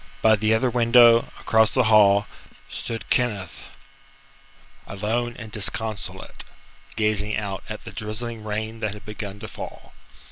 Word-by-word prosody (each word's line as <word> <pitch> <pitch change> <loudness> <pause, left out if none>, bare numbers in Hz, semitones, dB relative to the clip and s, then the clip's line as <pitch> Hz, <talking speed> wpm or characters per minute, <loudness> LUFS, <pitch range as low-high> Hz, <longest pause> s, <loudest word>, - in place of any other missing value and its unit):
By 110 0 +6
the 110 +1 0
other 120 +2 +1
window, 115 0 +6
across 110 -1 +4
the 130 - +2
hall, 105 -2 +5 0.5
stood 115 -1 -5
Kenneth, 105 -8 -1 1.2
alone 115 +4 -2
and 115 -3 -9
disconsolate, 110 0 -3 0.5
gazing 105 -1 0
out 100 -3 -4
at 110 - -6
the - - -8
drizzling 110 +1 -4
rain 110 +1 -4
that 105 -2 -2
had 105 0 -13
begun 105 -2 -7
to - - -6
fall. - - -9
110 Hz, 135 wpm, -24 LUFS, 105-115 Hz, 1.2 s, By